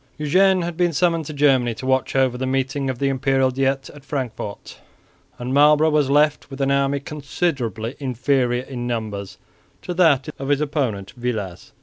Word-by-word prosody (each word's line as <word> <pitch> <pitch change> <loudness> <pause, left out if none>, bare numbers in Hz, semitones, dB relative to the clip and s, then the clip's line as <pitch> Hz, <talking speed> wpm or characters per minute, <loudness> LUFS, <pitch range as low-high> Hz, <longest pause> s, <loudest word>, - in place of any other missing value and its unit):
Eugene 185 +5 +3
had 170 0 -4
been 175 0 +1
summoned 165 0 +1
to 155 - -6
Germany 135 -5 +2
to 115 - -8
watch 130 0 0
over 130 -2 +2
the 130 +1 -3
meeting 135 +1 -1
of 130 - -3
the 140 - 0
Imperial 135 -1 +1
Diet 135 +1 0
at 145 -1 -14
Frankfort, 130 -7 -5 0.6
and 125 +2 -4
Marlborough 150 +2 +5
was 150 -3 +2
left 150 +1 +2
with 135 0 -9
an 135 0 +1
army 140 0 +1
considerably 140 -6 -3
inferior 125 -1 0
in 125 -2 -6
numbers 110 -5 -4 0.5
to 180 - -4
that 160 -6 +3
of 135 0 -4
his 145 -1 +3
opponent 135 -10 -2
Villars. 110 -8 -4
135 Hz, 170 wpm, -21 LUFS, 125-150 Hz, 0.6 s, Marlborough